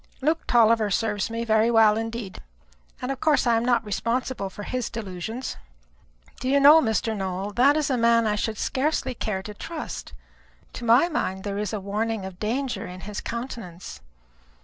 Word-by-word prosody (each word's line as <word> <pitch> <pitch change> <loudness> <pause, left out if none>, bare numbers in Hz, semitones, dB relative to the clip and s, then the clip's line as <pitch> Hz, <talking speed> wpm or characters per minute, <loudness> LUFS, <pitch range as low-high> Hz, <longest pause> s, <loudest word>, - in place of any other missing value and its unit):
Luke 315 +4 0
Tulliver 225 -2 +4
serves 205 0 0
me 230 +1 -3
very 220 0 +3
well 220 -2 +5
indeed, 225 -2 -5 0.6
and 250 - -1
of 270 - -4
course 300 -4 +3
I 235 -1 +4
am 225 - +1
not 240 -2 +2
responsible 230 +1 -2
for 205 +2 -9
his 250 +1 -3
delusions." 220 +3 -5 0.8
"Do 255 - -2
you 280 +1 +4
know, 295 +3 +8
Mr. 220 -2 0
Nowell, 190 0 -3
that 275 +6 +4
is 295 -2 0
a 255 - +1
man 230 0 +4
I 210 - +1
should 215 +1 -2
scarcely 270 +2 -1
care 210 -5 -3
to 210 - -7
trust. 315 +9 -7 0.6
To 240 - -6
my 240 +8 +5
mind 190 - -2
there 200 -1 -3
is 210 -2 -2
a 215 - -3
warning 210 +1 -2
of 190 -2 -9
danger 250 +5 -2
in 180 +1 -9
his 210 +1 -6
countenance." 230 -7 -7
225 Hz, 180 wpm, -25 LUFS, 205-250 Hz, 0.8 s, know